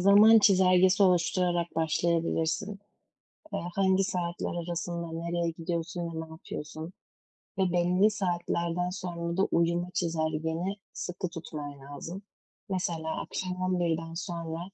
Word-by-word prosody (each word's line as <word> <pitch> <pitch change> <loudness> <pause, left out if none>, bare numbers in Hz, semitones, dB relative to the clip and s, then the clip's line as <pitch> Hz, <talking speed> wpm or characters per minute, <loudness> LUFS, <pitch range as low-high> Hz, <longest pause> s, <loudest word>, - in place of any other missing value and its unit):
zaman 205 +4 +8
çizelgesi 190 -1 +5
oluşturarak 175 -2 +2
başlayabilirsin. 165 +3 0 0.8
Eee, - - 0 0.2
hangi 190 0 +3
saatler 175 -2 -2 0.2
arasında 170 -1 -3
nereye 170 +1 -1
gidiyorsun 170 +1 -3
ve 165 -1 -4
ne 160 - -17
yapıyorsun 160 +1 -7 0.7
ve 185 -2 +2
belli 180 +4 +4
saatlerden 175 -2 -1
sonra 170 -2 -4
da 195 - +4
uyuma 170 +1 +1
çizelgeni 165 +1 -1 0.2
sıkı 180 0 -4
tutman 150 -4 -7
lazım. 145 +8 -7 0.5
Mesela, 170 -4 -2
akşam 185 0 -4
11'den 165 -3 0
sonra 165 -2 -4
170 Hz, 110 wpm, -29 LUFS, 165-185 Hz, 0.8 s, zaman